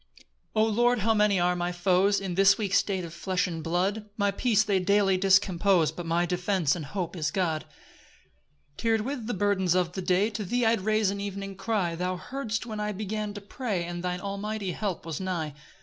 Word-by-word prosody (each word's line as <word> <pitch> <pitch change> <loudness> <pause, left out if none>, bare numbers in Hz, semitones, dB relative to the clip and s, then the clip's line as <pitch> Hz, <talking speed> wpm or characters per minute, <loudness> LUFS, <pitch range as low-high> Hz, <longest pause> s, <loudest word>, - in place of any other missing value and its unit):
1 215 0 +3
O - - 0
Lord, 240 +2 +2
how 225 +3 +3
many 210 -3 +3
are 180 0 +2
my 175 0 -1
foes, 185 +3 +2
In 190 -2 -4
this 195 +2 +5
weak 205 -3 -2
state 190 -3 +1
of 165 - -9
flesh 185 +1 -1
and 165 -3 -5
blood! 195 +6 -1
My 200 -1 +2
peace 215 +1 +2
they 200 -3 +1
daily 195 +1 +3
discompose, 190 -2 +3
But 175 -1 -7
my 170 +1 +2
defence 180 -3 +1
and 160 -4 -5
hope 175 +1 -4
is 155 -3 -1
God. 160 -3 -1 1.1
2 225 -1 +2
Tir'd - - -3
with 245 -1 -4
the 240 - -2
burdens 190 -2 +1
of 180 -2 +1
the 190 - -4
day, 185 +4 +2
To 210 0 -4
thee 240 +5 0
I 225 - +4
rais'd 215 -1 +1
an 200 0 -4
evening 195 -1 -5
cry; 195 -3 -1
Thou 180 +2 -2
heardst 225 0 -4
when 215 -3 -5
I 210 0 -2
began 210 +1 -4
to 205 - -6
pray, 205 -3 -3
And 175 0 -5
thine 180 0 -2
almighty 200 0 -3
help 190 -3 -3
was 165 -3 -4
nigh. 170 -5 -3
195 Hz, 210 wpm, -27 LUFS, 180-210 Hz, 1.1 s, this